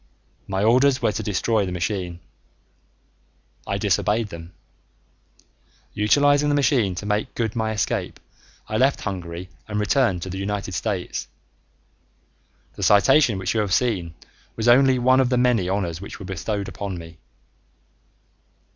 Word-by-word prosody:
My 95 Hz, 0 st, -1 dB
orders 130 Hz, +4 st, +4 dB
were -, -, +1 dB
to 110 Hz, -, -4 dB
destroy 105 Hz, +1 st, 0 dB
the 95 Hz, -, -4 dB
machine. 90 Hz, -1 st, -3 dB, 1.5 s
I -, -, -1 dB
disobeyed 105 Hz, +1 st, 0 dB
them. 85 Hz, -1 st, -10 dB, 1.4 s
Utilizing 145 Hz, +7 st, +3 dB
the 145 Hz, -, +2 dB
machine 125 Hz, -9 st, +2 dB
to 95 Hz, -, -6 dB
make 105 Hz, +1 st, -2 dB
good 115 Hz, -2 st, -2 dB
my 110 Hz, -1 st, -1 dB
escape, 105 Hz, -4 st, -2 dB, 0.5 s
I 110 Hz, -, -2 dB
left 135 Hz, +4 st, +2 dB
Hungary 90 Hz, -2 st, -6 dB, 0.2 s
and 105 Hz, -1 st, -2 dB
returned 105 Hz, -4 st, +1 dB
to 95 Hz, -, -6 dB
the 95 Hz, -, -5 dB
United 100 Hz, 0 st, -3 dB
States. 95 Hz, +1 st, -3 dB, 1.5 s
The -, -, -10 dB
citation 115 Hz, +2 st, +4 dB
which 95 Hz, -, -2 dB
you 115 Hz, -, 0 dB
have 100 Hz, -3 st, +1 dB
seen 95 Hz, -10 st, -1 dB, 0.4 s
was 110 Hz, +1 st, -2 dB
only 130 Hz, +2 st, +5 dB
one 130 Hz, +1 st, +4 dB
of 130 Hz, -2 st, +3 dB
the 125 Hz, -, +1 dB
many 120 Hz, -7 st, +2 dB
honors 90 Hz, -4 st, -2 dB
which 100 Hz, -, -8 dB
were 100 Hz, -, -9 dB
bestowed 95 Hz, +2 st, -3 dB
upon 100 Hz, -3 st, -5 dB
me. 80 Hz, 0 st, -11 dB
105 Hz, 145 wpm, -23 LUFS, 95-120 Hz, 1.5 s, only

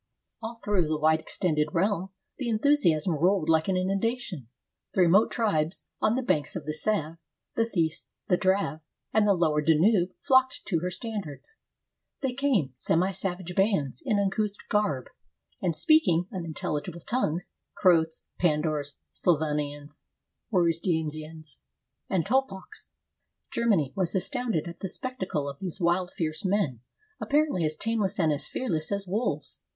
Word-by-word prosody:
All 230 Hz, +1 st, -6 dB
through 195 Hz, -6 st, +2 dB
the 155 Hz, 0 st, 0 dB
wide 155 Hz, +1 st, +3 dB
extended 155 Hz, -2 st, 0 dB
realm, 190 Hz, +1 st, +1 dB, 0.3 s
the 255 Hz, -3 st, -1 dB
enthusiasm 215 Hz, -, +3 dB
rolled 175 Hz, +2 st, +2 dB
like 160 Hz, -1 st, +3 dB
an 190 Hz, -1 st, +1 dB
innundation. 195 Hz, -, -1 dB, 0.5 s
The 190 Hz, -, +4 dB
remote 180 Hz, +5 st, +5 dB
tribes 170 Hz, -7 st, 0 dB
on 215 Hz, -, +3 dB
the 260 Hz, -, -1 dB
banks 150 Hz, -, 0 dB
of 165 Hz, -5 st, -5 dB
the 155 Hz, -, -2 dB
Save, 165 Hz, -1 st, -1 dB, 0.4 s
the 230 Hz, 0 st, +2 dB
Theiss, 165 Hz, -7 st, -1 dB, 0.2 s
the 180 Hz, -, +4 dB
Drave, 190 Hz, -5 st, +1 dB, 0.3 s
and 215 Hz, -1 st, +4 dB
the 200 Hz, -, +5 dB
lower 155 Hz, -3 st, +2 dB
Danube 175 Hz, +5 st, +4 dB
flocked 260 Hz, -1 st, +3 dB
to 170 Hz, -5 st, 0 dB
her 180 Hz, +2 st, -2 dB
standards. 205 Hz, -, -6 dB, 0.6 s
They 265 Hz, -2 st, -1 dB
came, 250 Hz, -, +1 dB
semi 170 Hz, +8 st, +1 dB
savage 180 Hz, -2 st, -4 dB
bands, 175 Hz, -, +1 dB
in 210 Hz, -, +1 dB
uncouth 200 Hz, +1 st, 0 dB
garb, 200 Hz, -12 st, +1 dB, 0.6 s
and 170 Hz, -4 st, 0 dB
speaking 245 Hz, -, +4 dB
unintelligible 170 Hz, -1 st, -4 dB
tongues 180 Hz, -6 st, -1 dB
— -, -, -56 dB
Croats, 165 Hz, -4 st, +3 dB
Pandours, 150 Hz, -3 st, 0 dB, 0.2 s
Slavonians, 150 Hz, -3 st, -1 dB, 0.5 s
Warusdinians, 160 Hz, -4 st, -1 dB, 0.5 s
and 185 Hz, -4 st, +1 dB
Tolpaches. 225 Hz, -6 st, -2 dB, 0.6 s
Germany 195 Hz, -, +1 dB
was 185 Hz, -2 st, 0 dB
astounded 230 Hz, -, 0 dB
at 170 Hz, -, -8 dB
the 190 Hz, -, -4 dB
spectacle 190 Hz, -, -3 dB
of 140 Hz, 0 st, -6 dB
these 185 Hz, -1 st, -5 dB
wild, 175 Hz, +1 st, +1 dB
fierce 160 Hz, +3 st, -2 dB
men, 190 Hz, -, 0 dB, 0.4 s
apparently 290 Hz, -, +1 dB
as 155 Hz, 0 st, -1 dB
tameless 210 Hz, -2 st, -1 dB
and 160 Hz, -3 st, +3 dB
as 145 Hz, -1 st, -1 dB
fearless 165 Hz, -11 st, -2 dB
as 200 Hz, 0 st, -1 dB
wolves. 205 Hz, +6 st, -2 dB
180 Hz, 145 wpm, -27 LUFS, 155-210 Hz, 0.6 s, remote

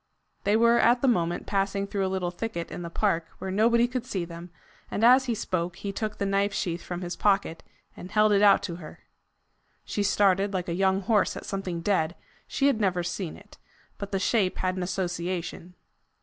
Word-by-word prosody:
They 205 Hz, +2 st, +4 dB
were 235 Hz, +1 st, +5 dB
at 240 Hz, +2 st, +4 dB
the -, -, +4 dB
moment 175 Hz, -7 st, +1 dB
passing 195 Hz, 0 st, 0 dB
through 200 Hz, -1 st, -1 dB
a -, -, -2 dB
little 185 Hz, -2 st, -2 dB
thicket 175 Hz, -3 st, -5 dB
in -, -, -6 dB
the 170 Hz, -, -5 dB
park, 170 Hz, -3 st, 0 dB
where 190 Hz, -, -5 dB
nobody 235 Hz, +4 st, +3 dB
could 250 Hz, -1 st, -3 dB
see 190 Hz, -8 st, -2 dB
them, 170 Hz, +1 st, -9 dB, 0.4 s
and 215 Hz, -, -2 dB
as 255 Hz, +3 st, +7 dB
he 240 Hz, -3 st, -1 dB
spoke, 180 Hz, -4 st, -2 dB
he 200 Hz, -, -5 dB
took 215 Hz, +1 st, -4 dB
the 200 Hz, -, -1 dB
knife 195 Hz, 0 st, +1 dB
sheath 170 Hz, -3 st, -2 dB
from 175 Hz, 0 st, -6 dB
his 175 Hz, -1 st, -4 dB
pocket, 195 Hz, -5 st, +1 dB, 0.3 s
and 180 Hz, -, -9 dB
held 215 Hz, +1 st, +3 dB
it 200 Hz, -1 st, +4 dB
out 200 Hz, -1 st, +6 dB
to 175 Hz, -4 st, -4 dB
her. 155 Hz, -4 st, -11 dB, 0.8 s
She 205 Hz, -, -2 dB
started 200 Hz, 0 st, +2 dB
like 180 Hz, -1 st, -2 dB
a 170 Hz, -, -2 dB
young 190 Hz, +2 st, +2 dB
horse 210 Hz, +2 st, +1 dB
at -, -, -8 dB
something 190 Hz, -4 st, -4 dB
dead: 175 Hz, -3 st, +1 dB, 0.3 s
she 275 Hz, -, -1 dB
had 275 Hz, -6 st, +3 dB
never 180 Hz, -3 st, +1 dB
seen 175 Hz, -1 st, -4 dB
it, -, -, -18 dB, 0.4 s
but 200 Hz, -1 st, -6 dB
the 195 Hz, -, 0 dB
shape 195 Hz, -1 st, +1 dB
had 185 Hz, 0 st, -1 dB
an 185 Hz, -, -3 dB
association. 180 Hz, -1 st, -3 dB
195 Hz, 205 wpm, -27 LUFS, 175-210 Hz, 0.8 s, as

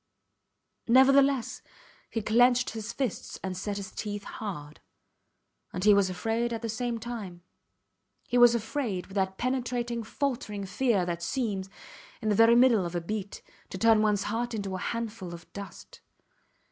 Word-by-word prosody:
Nevertheless, 270 Hz, +1 st, +4 dB, 0.5 s
he 225 Hz, -, -3 dB
clenched 245 Hz, +3 st, +4 dB
his 220 Hz, -1 st, -5 dB
fists 260 Hz, -7 st, -4 dB
and 190 Hz, -1 st, -3 dB
set 200 Hz, +2 st, -3 dB
his 195 Hz, -1 st, -6 dB
teeth 205 Hz, -1 st, -5 dB
hard. 150 Hz, -9 st, -7 dB, 0.9 s
And 180 Hz, -, -3 dB
he 210 Hz, 0 st, +7 dB
was 200 Hz, -2 st, +3 dB
afraid 225 Hz, +6 st, -1 dB
at 230 Hz, 0 st, -4 dB
the 230 Hz, -, -2 dB
same 235 Hz, +1 st, -2 dB
time. 215 Hz, -7 st, -7 dB, 0.8 s
He 245 Hz, -, -2 dB
was 240 Hz, -1 st, +7 dB
afraid 225 Hz, -4 st, -2 dB
with 195 Hz, -, -14 dB
that 190 Hz, 0 st, 0 dB
penetrating 245 Hz, -2 st, -1 dB
faltering 225 Hz, -4 st, -3 dB
fear 205 Hz, -2 st, +1 dB
that 170 Hz, -1 st, -3 dB
seems, 195 Hz, 0 st, -2 dB, 0.5 s
in 215 Hz, -, -2 dB
the 210 Hz, -, +3 dB
very 225 Hz, +2 st, +6 dB
middle 240 Hz, -5 st, +5 dB
of 175 Hz, 0 st, -5 dB
a -, -, +1 dB
beat, 200 Hz, +2 st, -5 dB, 0.3 s
to -, -, -6 dB
turn 225 Hz, +1 st, +5 dB
ones 210 Hz, -2 st, +2 dB
heart 230 Hz, +2 st, -2 dB
into 200 Hz, -3 st, -4 dB
a 185 Hz, -, -3 dB
handful 220 Hz, -5 st, -4 dB
of 170 Hz, -, -13 dB
dust. 200 Hz, 0 st, -10 dB
220 Hz, 160 wpm, -28 LUFS, 195-240 Hz, 0.9 s, he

